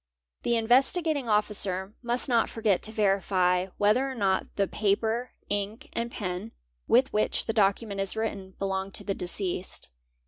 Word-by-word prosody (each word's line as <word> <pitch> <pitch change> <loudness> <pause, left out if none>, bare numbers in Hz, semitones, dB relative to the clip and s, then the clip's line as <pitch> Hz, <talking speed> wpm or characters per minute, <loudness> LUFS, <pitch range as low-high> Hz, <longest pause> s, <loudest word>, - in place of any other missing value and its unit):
The 235 - +1
Investigating 265 +4 +2
Officer 200 -2 0
must 240 +2 0
not 235 -3 +2
forget 215 -4 +1
to 220 - -2
verify 190 -3 +2
whether 220 +7 +3
or 265 - -5
not; 195 -4 +1
_ - - -25
the 200 -1 +1
paper, 220 +5 0
ink, 205 +2 -3
and 235 0 -2
pen 185 +1 -4 0.3
with 255 +3 +4
which 215 - +1
the 225 - -1
document 200 -1 +1
is 195 +1 +1
written 200 -4 -4
belong 195 0 -2
to - - -6
i - - -21
the 195 - 0
deceased. 180 0 -1
210 Hz, 165 wpm, -28 LUFS, 195-230 Hz, 0.3 s, with